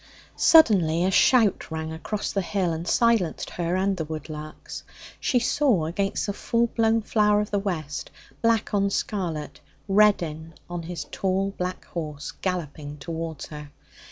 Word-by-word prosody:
Suddenly 180 - +5
a 190 - +2
shout 225 0 +4
rang 160 0 -4
across 205 +6 -3
the 195 - 0
hill 185 -2 -1
and 165 +2 -5
silenced 230 -7 +2
her 175 0 -1
and 195 +1 +1
the 160 - -1
woodlarks. 155 0 -7 0.4
She 255 - +1
saw 245 - +2
against 195 +5 -1
the 200 - -2
full 230 +3 +1
blown 225 -1 +1
flower 210 -1 +3
of 210 - -2
the 205 - +1
west 160 -7 -4 0.3
black 230 -2 +2
on 200 -1 +2
scarlet 175 -7 -3 0.3
Reddin 170 -6 +2
on 175 -1 -4
his 165 -2 -6
tall 195 +1 0
black 180 0 -4
horse, 150 -4 -5
galloping 150 -5 -4
towards 165 0 -5
her. 150 -1 -8
180 Hz, 150 wpm, -25 LUFS, 160-210 Hz, 0.4 s, Suddenly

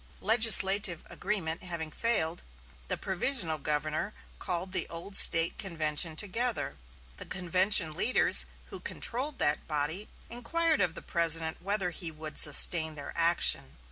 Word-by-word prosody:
Legislative 205 -5 +3
agreement 165 -6 -4
having 170 -3 -6
failed, 175 -6 0 0.5
the - - -2
provisional 190 - 0
governor 155 +7 -4 0.2
called 180 +1 -2
the - - -1
old 170 +4 -8
State 165 -3 +5
convention 160 -3 -1
together. 225 - -1 0.4
The - - -9
convention 185 -1 +1
leaders 205 +11 +2 0.2
who - - -5
controlled 270 +4 -1
that 150 - -1
body 155 +7 -4 0.2
inquired 315 +5 -2
of 175 -3 -1
the - - -9
President 165 -1 0
whether 195 -1 -1
he 170 -1 -5
would 155 -1 -8
sustain 160 +1 +5
their 145 -1 -9
action. 170 - +1
175 Hz, 130 wpm, -28 LUFS, 160-205 Hz, 0.5 s, State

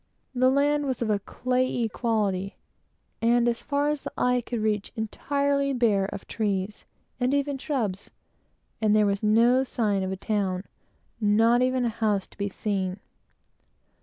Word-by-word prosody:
The 255 0 +3
land 290 +2 +2
was 255 -2 -1
of 215 - 0
a 205 - +1
clayey 250 +2 -1
consistency, 205 -4 -1 0.7
and, 235 +1 +3
as 235 -1 0
far 285 0 0
as 300 -1 -1
the - - -6
eye 250 0 +2
could 235 0 -4
reach, 215 -2 -1
entirely 280 +5 0
bare 220 -6 +2
of 195 - -7
trees 205 -2 -2 0.3
and 255 +2 +1
even 280 -1 -1
shrubs; 220 -10 -2 0.7
and 215 -1 +3
there 215 -1 +4
was 200 0 0
no 230 +4 +4
sign 215 -6 0
of 190 0 -2
a 190 - -3
town, 195 -3 -1 0.6
not 225 +3 +4
even 255 0 +1
a - - +1
house 215 -3 0
to - - -20
be 200 0 -1
seen. 195 -2 -2
230 Hz, 160 wpm, -26 LUFS, 205-255 Hz, 0.7 s, there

